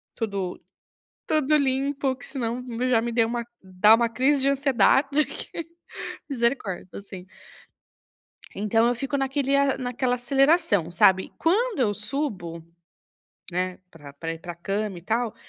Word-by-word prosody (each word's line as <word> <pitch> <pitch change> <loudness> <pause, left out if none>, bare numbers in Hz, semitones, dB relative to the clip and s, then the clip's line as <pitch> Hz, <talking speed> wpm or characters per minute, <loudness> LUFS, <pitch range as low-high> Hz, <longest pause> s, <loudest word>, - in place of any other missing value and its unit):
tudo, 200 -5 -3 0.7
tudo 305 -1 +2
limpo, 270 -1 0
que - - -11
senão 250 -2 -3 0.3
já 230 - +4
me 235 0 -2
deu 230 -1 +2
uma 235 0 -2 0.2
dá 190 +3 +5
uma 235 +1 +2
crise 265 +4 +2
de 275 - +3
ansiedade 275 +1 +3
que - - -8 0.8
misericórdia, 235 -8 -1
assim. 190 -2 -10 1.3
Então 225 +3 +2
eu 245 - +1
fico 275 +3 -3
naquele 270 0 0
a 280 -1 +2
naquela 250 0 -1
aceleração, 270 - +2
sabe, 190 +2 +4
quando 420 - +1
eu 205 -4 +2
subo, 205 - -4 0.9
né, 180 +1 -2
pra 145 -3 -13
pra 165 +3 -5
ir 165 - -10
pra 175 +1 -7
cama 195 +2 -3
e 170 - -10
tal, 225 +3 -1
235 Hz, 140 wpm, -25 LUFS, 195-275 Hz, 1.3 s, dá